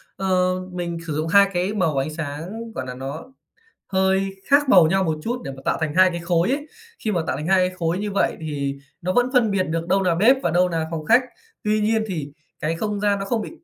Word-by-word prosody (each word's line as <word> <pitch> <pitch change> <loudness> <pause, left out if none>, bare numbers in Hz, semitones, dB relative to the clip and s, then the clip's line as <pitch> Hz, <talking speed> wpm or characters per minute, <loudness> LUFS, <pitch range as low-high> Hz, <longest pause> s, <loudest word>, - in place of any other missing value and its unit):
Ờ, 185 -1 +1 0.2
mình 175 -1 -4
sử 155 - -2
dụng 155 +1 -1
2 200 +3 +6
cái 180 +4 0
màu 170 -8 0
ánh 135 +3 0
sáng, 165 +10 -6
gọi 130 - -3
là, 125 - -5
nó 140 - -7 0.6
hơi 190 0 +1
khác 285 -1 +4
màu 175 -7 +7
nhau 190 +3 +2
một 160 -3 -1
chút 245 +1 -3
để - - -5
mà 135 - -11
tạo - - +1
thành 155 -1 -1
2 185 0 +6
cái 170 -1 -4
khối 170 +3 +1
ấy. 290 +2 -2 0.3
Khi 220 - -2
mà 175 -5 0
tạo 130 - -1
thành 150 - -4
2 185 -1 +3
cái 185 - -13
khối 165 +1 0
như 210 0 -3
vậy 200 - 0
thì 140 -3 -3 0.3
nó 185 +2 -1
vẫn 245 +1 +3
phân 235 -5 +3
biệt 190 -2 +1
được 165 +1 -3
đâu 195 +1 +2
nà 175 -2 +2
bếp 230 +9 +5
và 170 - +1
đâu 180 +1 +3
nà 160 -1 -2
phòng 155 -2 -4
khách. 240 +3 +5 0.4
Tuy 210 0 +1
nhiên 220 +1 +2
thì 155 -7 -4 0.3
cái 160 +2 -1
không 210 +3 -2
gian 205 -1 +1
nó 195 - -3
không 220 +2 -1
bị - - -6
185 Hz, 255 wpm, -22 LUFS, 160-205 Hz, 0.6 s, màu